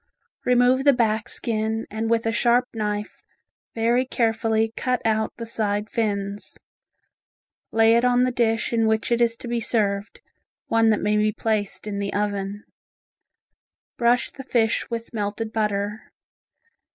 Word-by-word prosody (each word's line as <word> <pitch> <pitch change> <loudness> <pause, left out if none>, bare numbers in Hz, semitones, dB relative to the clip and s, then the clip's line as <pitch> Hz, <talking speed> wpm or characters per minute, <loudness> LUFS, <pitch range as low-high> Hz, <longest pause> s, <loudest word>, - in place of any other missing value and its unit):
Remove 250 +1 +4
the 280 0 +6
back 220 -3 0
skin 220 -1 -2
and 220 +1 -2
with 230 0 +1
a 225 - +1
sharp 240 +2 +2
knife 210 -2 -3 0.5
very 235 +2 +2
carefully 225 -2 0
cut 250 -1 0
out 220 -1 +1
the 230 - -5
side 210 -2 -1
fins, 205 -2 -2 1.1
lay 225 0 +5
it 235 - +3
on 250 0 +3
the 255 - +1
dish 230 -1 0
in 225 -1 +2
which 220 +2 0
it 235 0 +2
is 230 -1 +3
to 240 - -9
be 240 0 -1
served, 205 -3 -1 0.5
one 225 0 +3
that 215 - +2
may 210 0 +1
be 215 0 +2
placed 215 -2 -2
in 205 -1 -4
the 200 0 -2
oven. 205 0 -2 1.3
Brush 240 0 +2
the - - -9
fish 230 -3 0
with 230 0 -5
melted 215 +1 -3
butter. 210 -1 -2
225 Hz, 150 wpm, -23 LUFS, 210-235 Hz, 1.3 s, the